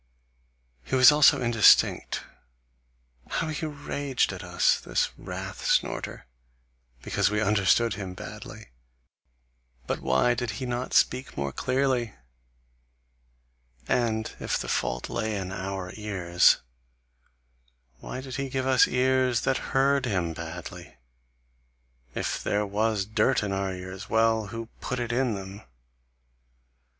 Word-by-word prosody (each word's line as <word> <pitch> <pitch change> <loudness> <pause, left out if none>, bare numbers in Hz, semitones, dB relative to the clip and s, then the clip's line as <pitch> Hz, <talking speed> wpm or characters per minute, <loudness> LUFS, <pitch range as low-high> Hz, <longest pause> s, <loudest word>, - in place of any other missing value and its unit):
He 60 - -2
was 130 +2 +9
also 150 -1 +6
indistinct. 115 -2 +4 1.1
How 160 - -1
he 155 +1 -3
raged 145 -2 -2
at - - -8
us, - - +2
this - - -1
wrath - - -7
snorter, - - -1 0.8
because 100 -2 +1
we 105 0 0
understood 105 +2 +3
him 95 -3 -6
badly! - - -9 1.2
But - - -2
why 65 - +2
did 120 -2 -3
he 130 - -4
not 125 0 -3
speak 130 - +2
more 70 0 -2
clearly? 130 - 0 1.7
And 110 -2 0
if - - -1
the - - -5
fault - - -1
lay 110 -1 -2
in 95 -1 -4
our 95 -1 -4
ears, 95 -5 +3 1.4
why 130 - -6
did 130 0 -7
he 135 -1 -3
give 130 0 -2
us 130 -1 +5
ears 130 -2 +2
that 135 - +1 0.2
heard 135 -1 +3
him 90 -6 -1
badly? 85 +1 -8 1.2
If - - -2
there 105 0 0
was 105 0 0
dirt 110 +4 +1
in 100 - -2
our 95 0 -1
ears, 95 +2 -8
well! 110 -1 +2
who 115 +2 -6
put 125 - -3
it 120 -1 -2
in 120 -2 +1
them? 95 +1 -8
110 Hz, 125 wpm, -27 LUFS, 95-130 Hz, 1.7 s, was